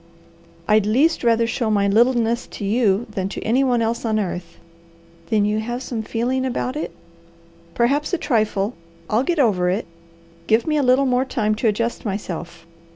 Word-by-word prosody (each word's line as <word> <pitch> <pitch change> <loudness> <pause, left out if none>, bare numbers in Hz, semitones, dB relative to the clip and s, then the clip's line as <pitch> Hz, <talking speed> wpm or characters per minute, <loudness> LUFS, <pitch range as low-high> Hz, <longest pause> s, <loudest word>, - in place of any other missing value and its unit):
"I'd 210 -1 +3
least 280 +10 +2
rather 230 -1 +3
show 230 0 -1
my 200 -2 +2
littleness 235 +2 +2
to 205 - -7
you 215 0 +2
than 190 -2 -3
to - - -6
any 250 +5 +2
one 245 -3 +2
else 230 +1 -2
on 220 -2 0
earth." 180 -4 -4 0.7
"Then 210 -2 +2
you 210 +1 0
have 240 +3 -4
some 235 -4 -4
feeling 240 +4 -1
about 255 0 -2
it?" 305 - -3 0.9
"Perhaps 280 +5 +1
a 360 - +1
trifle. 215 -6 0 0.4
I'll 220 +3 +3
get 340 +6 -1
over 195 -10 +2
it. 195 +5 -1 0.6
Give 220 +1 +3
me 305 -1 +1
a - - +3
little 260 +1 +3 0.2
time 215 -5 0
to 220 +2 0
adjust 230 +2 -1
myself. 170 -5 -5
230 Hz, 170 wpm, -21 LUFS, 210-250 Hz, 0.9 s, I'd